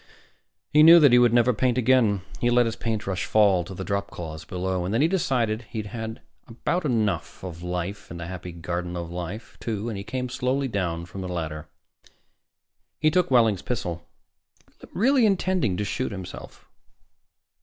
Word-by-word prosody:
He 150 - +7
knew 165 +2 +10
that 145 -5 +6
he 125 - +7
would 120 -2 +5
never 120 +1 +4
paint 125 +2 +1
again. 120 -6 +3 0.2
He 120 - +2
let 120 0 +4
his 115 0 -2
paintbrush 105 -5 -2
fall 100 -4 +4
to 95 +3 -9
the 95 - -5
dropcloths 85 -6 -4
below. 90 0 -2
And 90 - -3
then 115 +6 +2
he - - +5
decided 125 - 0
he 115 - -7
had 105 - -10
had 110 -1 -6 0.3
about 160 +9 -2
enough 110 -9 -1
of 85 -3 -7
life 90 +3 -4
in 85 - -7
the 85 - -6
Happy 90 0 -7
Garden 85 +1 -4
of 85 -1 -5
Life, 90 +5 -7
too, 110 0 -3
and 110 - -4
he - - -6
came 125 +3 -3
slowly 130 +2 -1
down 85 -7 -2
from 95 +3 -8
the 95 - -5
ladder. 80 -3 -5 1.3
He 155 0 +3
took 180 +1 +2
Wehling's 115 -7 +4
pistol, 90 -9 -4 0.8
really 255 +5 +3
intending 185 - +1
to 105 - -1
shoot 120 +5 -2
himself. 95 -2 -9
105 Hz, 175 wpm, -25 LUFS, 90-125 Hz, 1.3 s, knew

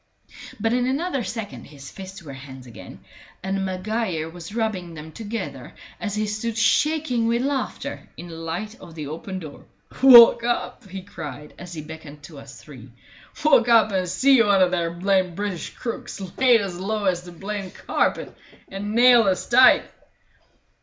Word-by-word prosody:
But 225 +2 0
in 245 0 +1
another 275 0 -1
second 220 0 -6
his 140 -2 -12
fists 190 -1 -10
were 140 -3 -9
hands 130 -1 -11
again, 105 -7 -12 0.4
and 195 0 -2
Maguire 185 -3 -2
was 175 +4 -10
rubbing 190 -7 -3
them 155 +1 -9
together 225 +4 -7 0.2
as 205 -2 -4
he 215 0 -1
stood 215 +2 -3
shaking 280 -2 +1
with 235 +2 +1
laughter 280 +1 -4
in 175 - -9
the - - -9
light 165 +6 -5
of 170 -3 -12
the 155 -2 -6
open 165 +6 -6
door. 155 -5 -10 0.4
"Walk 240 -3 +9
up!" 240 -4 -3
he 190 0 -7
cried, 150 -5 -9
as 175 -1 -9
he 155 - -6
beckoned 150 -2 -11
to 145 -1 -11
us 140 0 -13
three. 130 -5 -13 0.6
"Walk 260 -6 +5
up 225 -2 +5
and 185 -2 -1
see 265 +5 +4
one 200 -3 +4
o' 180 - +3
their 170 -2 -1
blamed 185 0 0
British 200 -3 -4
crooks 235 -2 -6 0.2
laid 245 -4 +4
as 185 -3 -5
low 210 +2 -2
as 180 -2 +1
the 175 0 -12
blamed 195 +2 -6
carpet, - - -1 0.3
and 205 +2 -5
nailed 240 -2 +6
as 185 -2 0
tight!" 255 +1 +6
195 Hz, 170 wpm, -23 LUFS, 165-230 Hz, 0.6 s, Walk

